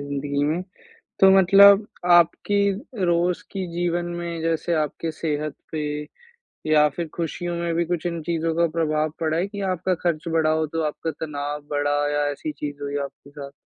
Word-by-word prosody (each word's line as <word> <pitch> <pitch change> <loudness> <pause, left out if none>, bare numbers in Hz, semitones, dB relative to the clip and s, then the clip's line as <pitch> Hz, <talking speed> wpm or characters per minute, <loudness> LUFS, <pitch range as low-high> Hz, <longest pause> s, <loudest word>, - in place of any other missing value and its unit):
ज़िन्दगी 140 0 -2
में 160 +5 0 0.6
तो 195 - +7
मतलब 200 +2 +7 0.2
आपकी 175 +4 +4 0.5
रोज़ 175 +1 +1
की 190 -2 -3
जीवन 175 0 -1
में 170 -1 -4
जैसे 165 +1 0
आपके 160 +2 -3
सेहत 155 -1 -3 0.2
पे 155 -1 -2 0.9
या 150 -1 +6
फिर 170 -1 -3
खुशियों 175 +1 -3
में 170 -1 -1
भी 170 0 +1
कुछ 175 0 -3
इन 170 -1 -2
चीज़ों 165 -1 -1
का 170 0 +3
प्रभाव 155 -1 +1
पड़ा 160 0 0
है 185 +3 0
कि 200 0 -7
आपका 185 +2 -1
खर्च 170 -1 -1
बढ़ा 160 -1 +2
हो 155 0 +1
तो 165 +2 -3
आपका 160 +2 -4
तनाव 145 -1 -4
बढ़ा 145 0 0
या 145 0 +1
ऐसी 145 +2 -5
चीज़ 145 -1 -6
हुई 145 0 -3
आपके 140 0 -14
साथ? 140 -1 -9
165 Hz, 175 wpm, -23 LUFS, 150-175 Hz, 0.9 s, तो